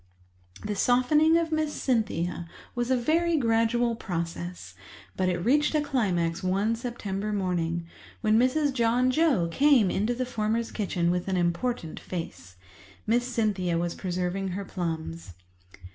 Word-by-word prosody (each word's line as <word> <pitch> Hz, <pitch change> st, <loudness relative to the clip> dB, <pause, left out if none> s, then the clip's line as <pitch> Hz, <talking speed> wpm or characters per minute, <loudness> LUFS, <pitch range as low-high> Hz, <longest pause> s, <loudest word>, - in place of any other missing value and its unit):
The 210 Hz, 0 st, -2 dB
softening 300 Hz, +9 st, +4 dB
of 330 Hz, -1 st, -1 dB
Miss 310 Hz, -1 st, 0 dB
Cynthia 180 Hz, -, -1 dB, 0.2 s
was 240 Hz, 0 st, -2 dB
a 260 Hz, -, +3 dB
very 330 Hz, +6 st, +2 dB
gradual 230 Hz, -1 st, +2 dB
process, 175 Hz, -2 st, -5 dB, 0.4 s
but 185 Hz, -1 st, +1 dB
it 180 Hz, -, 0 dB
reached 290 Hz, -, +2 dB
a -, -, +4 dB
climax 190 Hz, -, 0 dB
one 195 Hz, +5 st, +1 dB
September 215 Hz, -4 st, -4 dB
morning, 175 Hz, -4 st, -1 dB, 0.4 s
when 215 Hz, -1 st, +3 dB
Mrs. 275 Hz, +3 st, +2 dB
John 245 Hz, +1 st, +2 dB
Joe 270 Hz, -, +2 dB
came 270 Hz, -, +4 dB
into 215 Hz, +5 st, 0 dB
the 255 Hz, +1 st, -2 dB
former's 225 Hz, -1 st, -1 dB
kitchen 180 Hz, -5 st, 0 dB
with 180 Hz, +1 st, -2 dB
an 190 Hz, -1 st, 0 dB
important 175 Hz, +1 st, -1 dB
face. 165 Hz, -, -7 dB, 0.5 s
Miss 240 Hz, +3 st, +1 dB
Cynthia 205 Hz, -8 st, 0 dB
was 170 Hz, 0 st, -1 dB
preserving 185 Hz, +1 st, -2 dB
her 195 Hz, +2 st, -4 dB
plums. 165 Hz, -, -5 dB
215 Hz, 140 wpm, -27 LUFS, 180-250 Hz, 0.5 s, softening